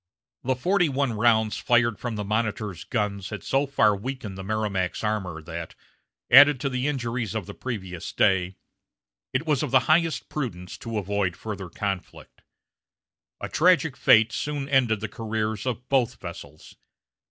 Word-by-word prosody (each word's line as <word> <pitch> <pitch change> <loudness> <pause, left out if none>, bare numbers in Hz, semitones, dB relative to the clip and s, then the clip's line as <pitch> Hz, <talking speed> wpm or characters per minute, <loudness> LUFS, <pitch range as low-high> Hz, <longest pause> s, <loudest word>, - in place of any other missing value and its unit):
The 130 +1 +1
forty 175 +5 +2
one 135 -3 0
rounds 110 -1 +2
fired 120 -2 +2
from 120 -3 -4
the 105 - -3
Monitor's 105 -3 -2
guns 100 -5 -2
had 105 - -6
so 140 +1 +1
far 120 -7 +3
weakened 110 -1 -6
the 95 - -7
Merrimac's 100 -3 -2
armor 95 -7 -2
that, 80 +1 -7 0.6
added 145 +1 +8
to 140 - 0
the 125 +1 -1
injuries 120 -6 -2
of 110 -5 -2
the - - -8
previous 95 -9 -6
day, 95 -1 +2 0.8
it 130 +5 -1
was 150 -5 +1
of 150 - -2
the 130 0 +5
highest 165 0 +2
prudence 90 -12 -5
to 115 -1 -4
avoid 100 -3 -1
further 100 -4 -6
conflict. 100 0 -5 1.0
A - - -3
tragic 160 -4 +3
fate 110 +1 +5
soon 145 +1 -3
ended 120 -6 +2
the 110 - -2
careers 110 0 -3
of 125 0 -3
both 125 -2 +1
vessels. 80 -4 -10
110 Hz, 155 wpm, -25 LUFS, 100-130 Hz, 1.0 s, added